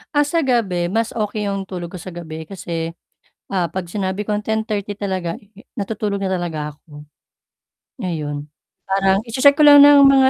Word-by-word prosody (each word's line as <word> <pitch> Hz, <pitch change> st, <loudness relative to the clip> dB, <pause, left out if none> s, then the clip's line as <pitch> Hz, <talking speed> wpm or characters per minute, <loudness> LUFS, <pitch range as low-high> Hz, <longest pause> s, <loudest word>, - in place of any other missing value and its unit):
Ah, 290 Hz, 0 st, +4 dB
sa 335 Hz, +3 st, +1 dB
gabi 195 Hz, -9 st, +1 dB
mas 225 Hz, +2 st, 0 dB
okay 210 Hz, -1 st, -2 dB
yung 195 Hz, -1 st, -2 dB
tulog 175 Hz, -2 st, -6 dB
ko -, -, -5 dB
sa 185 Hz, -, -8 dB
gabi 160 Hz, -2 st, -7 dB
kasi, 165 Hz, -3 st, -5 dB, 0.6 s
ah, 180 Hz, -3 st, +1 dB
'pag 185 Hz, 0 st, -4 dB
sinabi 190 Hz, +1 st, -2 dB
kong 210 Hz, 0 st, -1 dB
10:30 215 Hz, -2 st, -2 dB
talaga 185 Hz, -4 st, -3 dB, 0.4 s
natutulog 205 Hz, -1 st, -2 dB
na 190 Hz, -1 st, -1 dB
talaga 155 Hz, -4 st, -4 dB
ako, 150 Hz, 0 st, -14 dB, 1.0 s
ngayon, 150 Hz, -5 st, -3 dB, 0.4 s
parang 195 Hz, 0 st, +2 dB
i-che-check 270 Hz, +5 st, +5 dB
ko 305 Hz, -, +5 dB
lang 290 Hz, -1 st, +10 dB
ng 285 Hz, 0 st, +8 dB
mga 270 Hz, -1 st, +6 dB
195 Hz, 165 wpm, -20 LUFS, 175-220 Hz, 1.0 s, lang